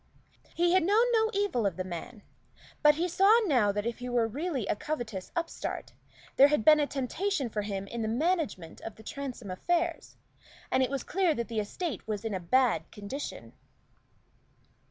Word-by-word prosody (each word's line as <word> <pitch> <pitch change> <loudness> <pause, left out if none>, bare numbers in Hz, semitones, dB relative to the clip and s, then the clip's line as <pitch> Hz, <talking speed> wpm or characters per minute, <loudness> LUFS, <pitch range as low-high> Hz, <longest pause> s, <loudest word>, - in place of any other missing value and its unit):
He 345 +1 +3
had 375 - +5
known 415 +7 +4
no 445 -1 +3
evil 395 - +1
of 190 - -3
the 185 - -2
man; 185 +5 -7 0.6
but 300 0 +6
he 340 +4 0
saw 390 +6 +5
now 245 - +3
that 205 +1 -3
if 235 +1 -3
he 250 0 -5
were 240 -2 +2
really 280 - -3
a - - 0
covetous 235 -8 -5
upstart, 340 -1 -4 0.4
there 275 - +9
had 290 -7 0
been 305 -1 +8
a 290 - +2
temptation 285 +2 -2
for 210 - -1
him 200 -1 -4
in 235 +3 -5
the 220 - -1
management 245 - -1
of 225 - -7
the 220 - -14
Transome 250 -5 -6
affairs; 340 - -1 0.5
and 260 - +3
it 260 - +2
was 275 -2 -3
clear 365 -4 +1
that 235 -2 -3
the 225 -2 -1
estate 230 - -4
was 215 0 -3
in 220 - -2
a 190 - -1
bad 250 +7 +2
condition. 210 +7 -7
260 Hz, 185 wpm, -29 LUFS, 215-335 Hz, 0.6 s, there